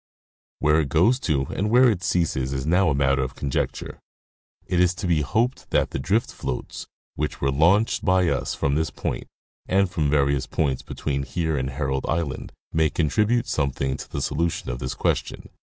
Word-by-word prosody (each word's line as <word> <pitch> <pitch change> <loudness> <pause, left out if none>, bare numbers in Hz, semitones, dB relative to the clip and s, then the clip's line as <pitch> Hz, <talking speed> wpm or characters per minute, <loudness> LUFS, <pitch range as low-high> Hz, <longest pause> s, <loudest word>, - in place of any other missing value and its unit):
Where 75 +1 +3
it 75 -3 -1
goes 95 - +3
to 70 - 0
and 105 +2 0
where 125 +3 +6
it 105 -7 +1
ceases 80 -7 0
is 65 0 -3
now 90 +3 +3
a 70 - +1
matter 70 -1 +2
of 65 -1 -4
con 70 - -4
jecture. - - -3 0.7
It 90 - 0
is 90 0 +3
to 105 - -5
be 85 -4 +2
hoped 110 - -1
that - - +1
the - - -3
drift 105 - 0
floats - - -5 0.3
which 75 - -3
were 70 - +1
launched 85 +10 +3
by 90 -2 +3
us - - -1
from 70 - 0
this 80 +2 0
point, - - -4 0.4
and 100 +1 +3
from 75 -4 0
various 70 -2 +2
poits 70 -4 -1
between 70 -2 -3
here 80 +3 -2
and 65 -1 -1
Herald 65 -1 -2
island, 80 -5 -2 0.2
may 80 -1 +3
contribute 105 - +1
something 70 - -1
to - - -9
the 70 - -2
solution 80 -3 -1
of - - -5
this 65 +1 -4
question. - - -2
75 Hz, 190 wpm, -24 LUFS, 70-90 Hz, 0.7 s, where